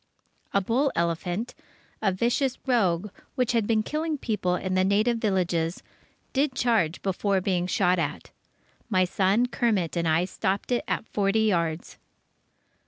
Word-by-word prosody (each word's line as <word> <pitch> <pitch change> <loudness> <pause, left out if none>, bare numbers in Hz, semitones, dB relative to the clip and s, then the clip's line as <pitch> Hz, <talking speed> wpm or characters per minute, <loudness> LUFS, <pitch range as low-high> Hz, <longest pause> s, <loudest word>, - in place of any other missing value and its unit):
A 200 - +2
bull 255 +8 +1
elephant, 175 +6 -1 0.5
a 200 -3 +2
vicious 240 +7 0
"rogue" 205 -7 +1 0.2
which 250 -3 +1
had 230 -3 +1
been 220 -2 +2
killing 310 +4 -2
people 210 -8 -1
in 185 +1 -3
the 185 0 +3
native 215 +5 +2
villages, 180 -5 0 0.5
did 275 0 +1
charge 225 -11 +1
before 195 0 +1
being 180 -1 0
shot 180 -1 +2
at. 165 - -3 0.6
My 185 -4 +3
son 195 +6 +2
Kermit 215 -9 0
and 170 -1 0
I 160 +2 +3
stopped 190 +3 -2
it 245 - +1
at - - -2
forty 205 +1 +1
yards. 170 -6 -1
195 Hz, 145 wpm, -26 LUFS, 180-235 Hz, 0.6 s, the